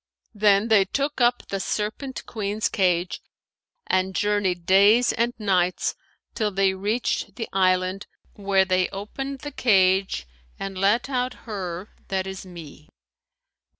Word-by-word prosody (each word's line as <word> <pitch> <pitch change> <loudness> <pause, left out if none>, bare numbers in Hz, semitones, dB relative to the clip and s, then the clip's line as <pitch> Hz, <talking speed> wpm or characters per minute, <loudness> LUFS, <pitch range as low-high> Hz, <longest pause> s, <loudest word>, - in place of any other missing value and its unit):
Then 205 +1 +3
they 210 -3 +6
took 280 +6 -2
up 240 0 +2
the 195 - -2
Serpent 220 +7 -3
queen's 210 -1 -2
cage 180 -2 0 0.6
and 185 0 0
journeyed 200 -4 0
days 205 +6 +5
and 235 +1 +1
nights, 185 -4 +1 0.4
till 215 -3 0
they 195 -1 +2
reached 210 +5 -2
the 225 - -4
island, 185 0 +1 0.3
where 195 -1 +2
they 185 -1 +1
opened 265 +7 -6
the 290 - -6
cage 190 - +2 0.3
and 195 0 -5
let 200 +7 +2
out 250 -2 -1
her 190 -3 -5 0.2
that 190 -1 -1
is 190 0 -7
me. 160 -4 -12
195 Hz, 130 wpm, -24 LUFS, 185-220 Hz, 0.6 s, they